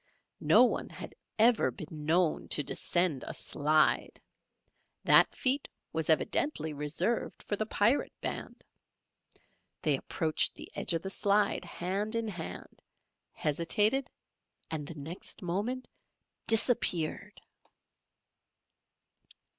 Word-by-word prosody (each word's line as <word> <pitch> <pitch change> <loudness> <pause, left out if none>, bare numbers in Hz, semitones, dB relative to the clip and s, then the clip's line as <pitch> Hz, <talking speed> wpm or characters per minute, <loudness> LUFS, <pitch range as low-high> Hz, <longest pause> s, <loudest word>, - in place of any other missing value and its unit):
No - - +6
one - - 0
had - - -9 0.2
ever 230 +1 +4
been 155 -3 -8
known 170 0 +2
to 150 - 0
descend 175 0 0
a - - -5
slide. 155 +1 +1 0.8
That - - +5
feat 270 +2 +1 0.3
was 160 -1 -2
evidently 160 - +1
reserved 155 +10 -2
for 205 - -2
the 215 +1 -3
Pirate 230 +6 +2
band. - - -6 1.2
They 150 -3 +3
approached 155 +3 0
the - - -9
edge - - -2
of 165 - -1
the 190 - -4
slide 200 -1 +1
hand 195 +6 -3
in 230 -1 -1
hand, 175 -5 -8 0.5
hesitated 210 - +1 0.6
and 150 -3 -3
the 165 - -8
next 160 +6 -7
moment 210 +9 -2 0.6
disappeared! 220 -8 +2
180 Hz, 105 wpm, -31 LUFS, 155-215 Hz, 1.2 s, No